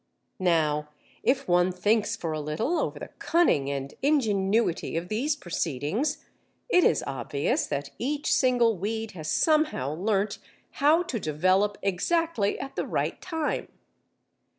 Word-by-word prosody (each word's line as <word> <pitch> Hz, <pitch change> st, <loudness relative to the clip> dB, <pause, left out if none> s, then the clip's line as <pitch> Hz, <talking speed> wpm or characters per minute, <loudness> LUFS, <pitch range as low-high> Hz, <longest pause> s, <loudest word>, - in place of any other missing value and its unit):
Now 155 Hz, -4 st, +1 dB, 0.3 s
if 270 Hz, +1 st, +1 dB
one 175 Hz, +1 st, +3 dB
thinks 210 Hz, +4 st, +1 dB
for 170 Hz, -8 st, -4 dB
a 155 Hz, -, -2 dB
little 155 Hz, -, -1 dB
over -, -, -2 dB
the -, -, -7 dB
cunning 325 Hz, -, +2 dB
and 140 Hz, 0 st, -4 dB
ingenuity 215 Hz, -, +1 dB
of 170 Hz, +2 st, -4 dB
these 270 Hz, +8 st, 0 dB
proceedings, 175 Hz, -, -2 dB, 0.4 s
it 360 Hz, -6 st, +5 dB
is 155 Hz, -, +3 dB
obvious 140 Hz, +1 st, -1 dB
that 140 Hz, -1 st, -3 dB
each 290 Hz, +4 st, 0 dB
single 240 Hz, -6 st, +3 dB
weed 220 Hz, +3 st, -3 dB
has 155 Hz, -4 st, -6 dB
somehow 305 Hz, -, +2 dB
learnt 200 Hz, +4 st, 0 dB, 0.4 s
how 310 Hz, +5 st, +5 dB
to 250 Hz, -9 st, -3 dB
develop 185 Hz, +6 st, +1 dB
exactly 210 Hz, -, 0 dB
at 270 Hz, -, -6 dB
the -, -, -2 dB
right -, -, -2 dB
time. 320 Hz, -4 st, -2 dB
200 Hz, 135 wpm, -27 LUFS, -, 0.4 s, it